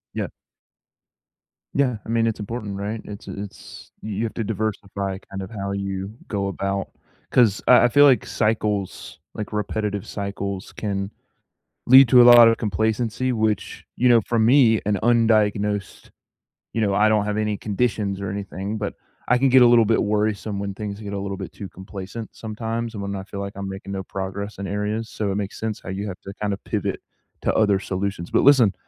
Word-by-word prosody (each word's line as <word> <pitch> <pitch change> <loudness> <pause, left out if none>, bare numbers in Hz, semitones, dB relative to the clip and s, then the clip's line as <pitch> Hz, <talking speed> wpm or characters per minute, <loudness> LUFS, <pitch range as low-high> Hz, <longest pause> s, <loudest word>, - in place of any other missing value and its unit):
Yep. - - -3 1.4
Yeah. 130 -5 +1
I - - -9
mean, 115 0 +2
it's 110 -1 -2
important 105 -2 -5
right? 105 +2 -4
It's 100 -1 -9
a 100 - -6
it's 100 - -12
you 105 +1 -3
have 115 - -3
to 115 - -2
diversify 100 -2 -3
kind 95 0 -5
of 95 - -7
how 100 -2 -4
you 100 +1 -4
go 100 -2 -2
about 100 +1 -3 0.4
'Cause 115 -5 +4
I 125 -1 +7
I - - +6
feel 145 +4 +6
like 135 -3 +4
cycles, 105 -3 -2
like 105 - -6
repetitive 105 -1 -2
cycles 100 -1 -5
can 100 -1 -3 0.8
lead 130 +1 +9
to 125 -2 +8
a - - +9
lot 120 -1 +9
of 115 0 +3
complacency, 110 +4 -1
which, 110 -2 -1
you 125 - +2
know, 115 -2 +6
for 115 +3 -2
me, 115 -1 +5
an 105 -1 +1
undiagnosed 105 -4 +1 0.6
you 115 - -1
know, 100 -2 +1
I 105 +2 +4
don't 105 -1 +2
have 105 0 -2
any 105 -1 -1
conditions 105 -2 -1
or 100 - -3
anything, 100 +1 -4
but 105 - -3 0.4
I 125 - +5
can 135 0 +3
get 130 0 +6
a - - +7
little 120 -2 +6
bit 115 +1 +2
worrisome 105 -1 -1
when 100 -1 -3
things 105 -1 -5
get 100 -2 -6
a 100 - -2
little 100 -1 -4
bit - - -7
too 100 - -8
complacent 95 +4 -8
sometimes, 115 +1 -4
and 100 - -5
when 100 0 -4
I 95 - -5
feel 100 0 -8
like 100 0 -5
I'm 100 0 -5
making 95 0 -7
no 95 - -3
progress 95 +2 -5
in 100 - -4
areas. 105 +3 -2
So, 105 -2 -2
it 95 - -2
makes 100 -1 -4
sense 110 -2 -3
how - - -9
you 95 +2 -4
have 90 - -7
to 100 - -9
kind 105 -1 0
of 100 - -7
pivot - - -2 0.4
to - - 0
other 105 -3 +3
solutions, 95 -2 -3
but - - +3
listen 125 -8 +6
105 Hz, 200 wpm, -23 LUFS, 100-115 Hz, 1.4 s, lead